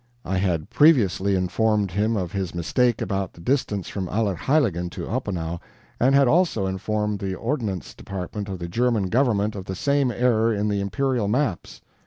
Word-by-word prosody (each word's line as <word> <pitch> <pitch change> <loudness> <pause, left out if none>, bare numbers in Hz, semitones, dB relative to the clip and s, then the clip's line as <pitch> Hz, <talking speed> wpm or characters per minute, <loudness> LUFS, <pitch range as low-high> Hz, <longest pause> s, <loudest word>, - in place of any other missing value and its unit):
I 95 - -1
had 85 -5 -1
previously 100 - +4
informed 100 +2 +1
him 105 +4 +1
of 90 -3 -3
his 95 -3 -3
mistake 120 +7 +1
about 95 -2 -2
the - - -17
distance 105 -2 -1
from 95 -2 -4
Allerheiligen 100 - 0
to - - -6
Oppenau, 90 -9 -3 0.4
and 130 +3 +4
had 140 -1 +5
also 160 - +2
informed 105 +2 -2
the 95 -1 -3
Ordnance 115 - -3
Depart 95 -1 -7
of 95 -2 -4
the 85 -1 -5
German 115 0 +1
government 110 -4 +1
of 95 -2 -6
the 95 - -4
same 140 +5 +1
error 115 -1 +2
in 105 -1 0
the 100 -1 0
imperial 125 +2 0
maps. 115 -4 -1
105 Hz, 170 wpm, -24 LUFS, 95-120 Hz, 0.4 s, had